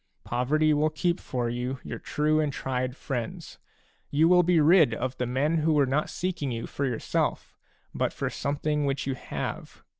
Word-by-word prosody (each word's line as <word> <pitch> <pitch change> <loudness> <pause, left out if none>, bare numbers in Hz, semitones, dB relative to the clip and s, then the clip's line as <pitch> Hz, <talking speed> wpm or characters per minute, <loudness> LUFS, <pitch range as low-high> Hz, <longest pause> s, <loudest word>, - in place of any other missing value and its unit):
Poverty 150 +6 +2
will 150 +1 +2
keep 170 +3 0
for 125 -2 -2
you 125 +3 -3
your - - -6
true 155 +1 +1
and 150 -2 +1
tried 130 -1 -2
friends; 120 -5 -5 0.5
you 155 +3 +4
will 180 +1 +6
be 175 -1 +3
rid 155 -5 +5
of 130 +2 -3
the 125 - 0
men 140 +6 +1
who 155 +1 +2
were 145 -2 +4
not 140 +4 0
seeking 175 -6 -2
you 115 -1 -3
for 140 - -3
yourself, 120 -3 -2 0.4
but - - 0
for - - -3
something 150 +1 -1
which 140 0 -1
you 135 - -1
have. 130 - -6
145 Hz, 180 wpm, -27 LUFS, 130-155 Hz, 0.5 s, will